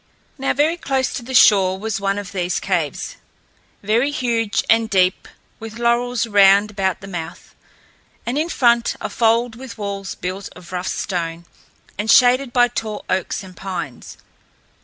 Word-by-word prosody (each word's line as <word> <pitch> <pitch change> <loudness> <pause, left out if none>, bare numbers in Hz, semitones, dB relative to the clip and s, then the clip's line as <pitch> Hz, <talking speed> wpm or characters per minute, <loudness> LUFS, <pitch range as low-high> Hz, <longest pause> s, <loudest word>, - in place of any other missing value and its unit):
Now 270 - 0
very 310 +4 +2
close 265 -5 -1
to - - -4
the 260 +2 -6
shore 190 -5 +5
was 210 0 -3
one 195 0 0
of 205 -2 -6
these 180 -2 -1
caves, 170 -7 -2 0.7
very 230 +7 +2
huge 235 -7 0
and 225 0 +3
deep, 185 -3 +1 0.3
with 225 0 -8
laurels 240 +1 +1
round 205 -1 +5
about 190 -3 -1
the 195 - -9
mouth, 175 -2 -7 0.7
and 240 - -2
in 310 +3 0
front 235 -5 +2
a - - -5
fold 230 0 +2
with 255 0 -10
walls 200 -2 -5
built 185 +2 -5
of 180 -1 -13
rough 180 0 -3
stone 170 -3 -3 0.5
and 210 +2 -2
shaded 250 +2 +5
by 245 0 +4
tall 220 -3 -5
oaks 185 +1 -1
and 185 -1 -12
pines. 180 -8 -6
210 Hz, 160 wpm, -20 LUFS, 190-240 Hz, 0.7 s, shore